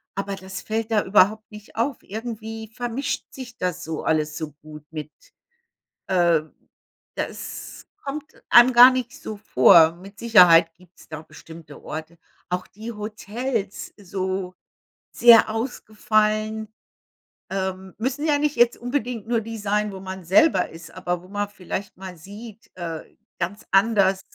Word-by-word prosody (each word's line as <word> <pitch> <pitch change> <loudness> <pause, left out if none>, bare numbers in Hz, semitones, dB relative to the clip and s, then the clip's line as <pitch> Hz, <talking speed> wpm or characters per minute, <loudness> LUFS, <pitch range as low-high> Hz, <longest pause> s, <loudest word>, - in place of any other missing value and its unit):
Aber 195 0 -3
das 190 0 -8
fällt 225 +1 -3
da 210 -2 +3
überhaupt 210 +3 +3
nicht 210 0 -13
auf. 240 +3 -1
Irgendwie 220 0 -7
vermischt 245 +3 -3
sich 250 -2 -10
das 180 -5 -3
so 160 -1 -5
alles 155 -1 0
so 155 -2 -6
gut 150 -1 -12
mit 155 -1 -7 1.0
äh, 175 -4 +3 0.7
das - - -6 0.2
kommt 295 +2 -6 0.2
einem 240 +1 +8
gar 245 +2 +10
nicht 255 -2 -3
so 215 - -6
vor. 160 -3 +6
Mit 195 +3 -14
Sicherheit 175 -8 +6
gibt's 180 +1 -21
da 155 -1 -7
bestimmte 160 0 -13
Orte. 160 +2 -7 0.3
Auch 180 0 -2
die 220 +3 -8
Hotels, 215 0 -4
so, 190 -1 -4 0.6
sehr 235 -1 +7
ausgefallen 215 -2 -1 0.8
ähm, 190 -1 -4
müssen 265 +6 -2
ja 300 -2 +3
nicht 295 0 0
jetzt 240 0 +4
unbedingt 245 -3 -3
nur 235 -1 +1
die 225 +1 -7
sein, 210 0 -1
wo 190 - -8
man 190 -1 -7
selber 190 - +4
ist, 165 +1 -12
aber 180 -1 -3
wo 180 - -16
man 205 +1 -3
vielleicht 200 -1 -6
mal 185 -1 -9
sieht, 210 +5 -12
äh, 165 -3 -5 0.3
ganz 185 +4 -4
anders 195 -1 +3
205 Hz, 145 wpm, -23 LUFS, 180-225 Hz, 1.0 s, gar